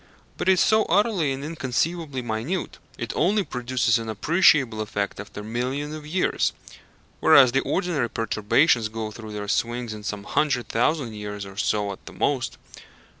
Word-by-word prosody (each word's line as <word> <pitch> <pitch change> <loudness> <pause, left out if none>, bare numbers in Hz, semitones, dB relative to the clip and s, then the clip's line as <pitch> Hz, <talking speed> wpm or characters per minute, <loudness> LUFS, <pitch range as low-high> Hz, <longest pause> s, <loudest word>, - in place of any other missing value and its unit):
But - - -1
it - - +8
is 185 - +2
so 220 0 +4
utterly 190 -5 +2
and 135 +1 -4
inconceivably 155 -1 -2
minute 120 +11 -3 0.2
it - - -4
only 200 +6 +2
produces 125 -5 0
an 115 -1 -6
appreciable 130 - +3
effect 100 -2 -3
after 105 0 -8
millions 130 +7 -3
of 155 -1 -8
years 180 +4 +1 0.7
whereas 130 -3 +7
the 135 - +2
ordinary 165 -10 -1
perturbations 115 +3 +2
go 110 0 -5
through 110 0 -9
their 105 -1 -5
swings 120 +2 -1
in 105 - -8
some 105 -1 -5
hundred 125 0 0
thousand 120 0 0
years 105 -1 -6
or 95 0 -11
so 105 0 0
at 95 - -10
the - - -9
most. - - -1
125 Hz, 165 wpm, -24 LUFS, 110-155 Hz, 0.7 s, it